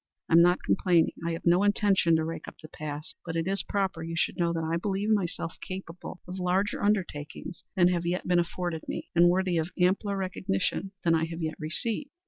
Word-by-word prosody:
I - - 0
am 165 - +9
not 175 +1 +4
complaining; 175 -4 +3
I 170 0 -1
have 165 - -6
no 175 +2 +5
intention 200 -4 +3
to 160 0 +1
rake 165 +1 -5
up - - -9
the 155 - -10
past; 150 0 -7
but 165 -1 -5
it 165 -1 0
is 195 +1 +1
proper 195 -4 -1
you 165 +1 -4
should - - +1
know 170 -1 +1
that 165 -1 -2
I 165 +1 0
believe 200 +3 -1
myself 180 -4 -1
capable 185 -1 -7
of 185 +1 -6
larger 185 +3 0
undertakings 175 -7 -2
than 180 -1 +5
have 170 -1 0
yet 180 +1 -1
been 175 -1 +4
afforded 170 -1 -2
me, - - -5
and 175 +1 +6
worthy 180 -1 +2
of 160 +2 -2
ampler 195 +3 +2
recognition 190 0 -2
than 165 - +3
I 160 0 +2
have 165 0 -5
yet 155 0 -1
received. 215 - -2
175 Hz, 215 wpm, -28 LUFS, 165-190 Hz, -, am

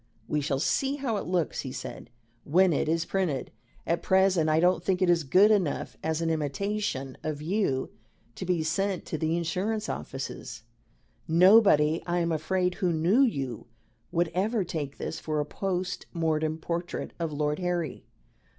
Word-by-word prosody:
"We 150 0 0
shall 140 -1 0
see 270 - +1
how 260 -6 -2
it - - -4
looks," 175 -3 0
he 130 - -6
said, - - -7 0.3
"when 180 +3 +4
it 150 - 0
is 165 0 +1
printed. 175 -9 -1 0.3
At 170 - 0
present 190 -4 +3
I 155 +1 +3
don't 175 0 +3
think 185 0 +1
it 185 -2 +4
is 170 -2 +2
good 190 +10 +5
enough 190 -8 0
as 160 +1 -1
an 165 - +1
imitation 155 -2 -2
of 155 -2 -3
you 155 -5 -1 0.4
to - - -7
be 180 -3 0
sent 185 +4 -1
to 160 - -4
the 160 +2 0
insurance 195 +6 -2
offices. 120 -3 -6 0.6
Nobody, 170 -3 +5
I 175 0 0
am 170 -1 +1
afraid, 180 +3 0
who 180 -1 0
knew 170 +10 +3
you, 135 - -1 0.4
would 170 0 +1
ever 205 +4 +1
take 150 -5 -5
this 160 - -4
for 155 -1 -2
a 150 - 0
post 185 +3 -3
mortem 160 -2 0
portrait 170 +2 -4
of 165 -2 -2
Lord 150 +1 -1
Harry. 175 -5 -2
170 Hz, 170 wpm, -28 LUFS, 155-190 Hz, 0.6 s, good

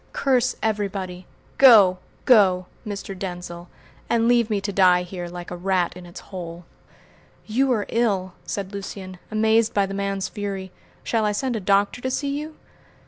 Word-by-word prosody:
Curse 255 -2 +1
everybody! 195 -4 -2 0.3
Go! 205 -9 +8 0.3
go! 190 -7 +5 0.2
Mr. 200 -1 -5
Denzil, 175 -2 -7 0.4
and 230 -1 +2
leave 235 -2 +3
me 210 -2 +1
to 200 +1 -4
die 180 -2 +5
here 180 -1 -6
like 175 0 -8
a - - -4
rat 180 -1 0
in 180 -1 -10
its 175 - -10
hole!" 175 -2 -8 0.8
"You 260 +5 +1
are 210 -4 -1
ill!" 195 -6 0
said 200 0 -5
Lucian, 190 -2 -7
amazed 220 +1 +2
by 200 -1 +3
the 195 - -6
man's 195 -1 -2
fury. 195 -3 -5 0.3
"Shall 225 -2 0
I 210 -1 +1
send 255 +3 -1
a - - -1
doctor 200 +4 +1
to 260 - -2
see 280 +2 -2
you?" 305 +2 -6
200 Hz, 165 wpm, -23 LUFS, 185-220 Hz, 0.8 s, Go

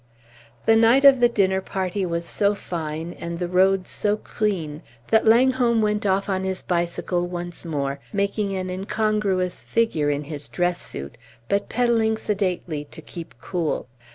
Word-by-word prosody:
The 225 - +6
night 230 +5 +5
of 275 -2 +8
the 240 0 +5
dinner 190 -4 +2
party 190 0 -2
was 170 0 -2
so 205 +3 +1
fine 165 -2 -5
and 170 0 -4
the 175 0 -2
roads 185 +1 +2
so 210 0 0
clean 170 -10 -2 0.3
that 220 0 +4
Langholm 240 0 +4
went 210 -1 +1
off 195 +1 +1
on 190 -1 -1
his 190 0 -2
bicycle 175 0 -1
once 175 -1 -5
more, 140 -3 -2
making 200 0 -1
an 185 -1 -3
incongruous 195 -1 0
figure 195 -11 +1
in 145 0 -1
his 145 -1 -7
dress 175 -1 0
suit, 70 +1 -7 0.3
but 200 0 0
pedalling 225 -2 +2
sedately 185 -8 -2
to 150 - -12
keep 170 +1 -9
cool. 170 -8 -2
190 Hz, 155 wpm, -23 LUFS, 170-215 Hz, 0.3 s, of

